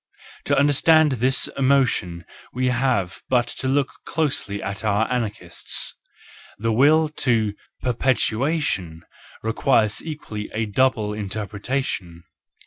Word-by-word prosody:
To - - +2
understand 150 +2 +5
this 130 +1 +2
emotion 125 -11 +1 0.3
we 125 +1 0
have 120 -8 0
but 125 -2 +3
to 130 - -2
look 135 +1 +1
closely 130 -10 -1
at 100 +2 -5
our 105 +1 +1
anarchists. 105 -8 -3 0.6
The 115 +1 -1
will 155 +6 +5
to 110 -5 +1 0.3
perpetuation 120 - 0 0.4
requires 110 -1 +2
equally 115 -10 -6
a 110 +1 0
double 110 0 +1
inter¬ 105 0 -4
pretation. 100 -6 -4
115 Hz, 110 wpm, -22 LUFS, 105-135 Hz, 0.6 s, understand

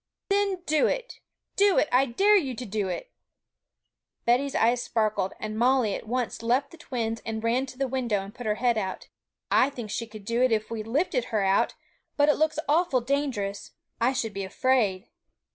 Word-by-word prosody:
'Then 395 -2 +1
do 305 0 +3
it, - - -3 0.4
do 400 -1 +4
it; - - +4
I 260 +2 +4
dare 395 - +4
you 275 -10 +1
to 245 - -6
do 205 -2 -2
it!' - - -5 1.1
Betty's 260 +4 +2
eyes 240 +2 +3
sparkled; 215 -5 0
and 215 0 -4
Molly 245 -2 +3
at - - -6
once 245 0 -2
left 245 +4 +1
the 335 - -13
twins, 230 -6 -3
and 220 0 -4
ran 245 +4 +1
to 255 - -11
the 270 0 0
window 240 -6 -1
and 200 +1 -10
put 245 -2 -7
her 210 - +1
head 240 -1 +1
out. 190 -2 -5 0.4
'I 260 - +5
think 240 -6 -7
she 230 +2 -3
could 215 -2 -11
do 230 +2 0
it 255 -1 +4
if 215 0 0
we 225 -1 -3
lifted 295 - 0
her 215 -4 0
out; 195 0 +2 0.4
but 290 0 +4
it - - +6
looks 310 0 +1
awful 300 -4 +2
dangerous; 240 -7 -2 0.3
I 240 +3 +4
should 225 -5 -2
be 195 0 -4
afraid.' 205 -1 +1
240 Hz, 195 wpm, -27 LUFS, 215-275 Hz, 1.1 s, it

